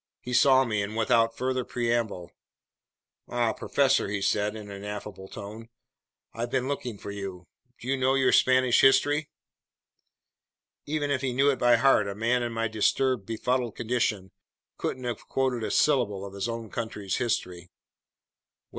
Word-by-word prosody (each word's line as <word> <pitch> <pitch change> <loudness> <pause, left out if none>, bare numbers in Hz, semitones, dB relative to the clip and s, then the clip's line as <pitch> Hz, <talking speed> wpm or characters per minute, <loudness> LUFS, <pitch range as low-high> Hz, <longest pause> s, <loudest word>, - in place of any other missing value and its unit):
He 125 - -7
saw 130 +1 +5
me, 105 -4 -1
and 105 +2 -4
without 115 0 +2
further 130 0 -1
preamble: 115 -8 -2 1.0
"Ah, 120 -2 0
professor," 135 -5 +1
he 100 0 -2
said 105 +2 0
in 105 -2 -8
an 100 0 -8
affable 105 -2 -7
tone, 110 +3 -9 0.6
"I've 115 +2 -4
been 130 0 -1
looking 125 -6 -4
for 100 - -7
you. 95 -3 -7 0.3
Do 120 - -10
you 135 - +2
know 130 +1 +2
your 135 -1 +3
Spanish 130 -1 +4
history?" 145 +3 +4 1.6
Even 145 -1 -1
if 135 -2 0
he 130 -2 -1
knew 140 +3 +4
it 135 - -4
by 120 0 +5
heart, 115 -4 +4
a 100 - -4
man 115 +4 +1
in 120 -1 -2
my 115 0 -1
disturbed, 110 +1 +1
befuddled 120 +1 -1
condition 110 -5 -1 0.5
couldn't 130 - -3
have 120 -3 -5
quoted 130 -3 -1
a - - -2
syllable 110 -10 +1
of 100 - -9
his 100 +3 -3
own 115 -2 -6
country's 105 -4 -3
history. 90 -7 -2
"Well?" - - -65
115 Hz, 165 wpm, -27 LUFS, 105-130 Hz, 1.6 s, saw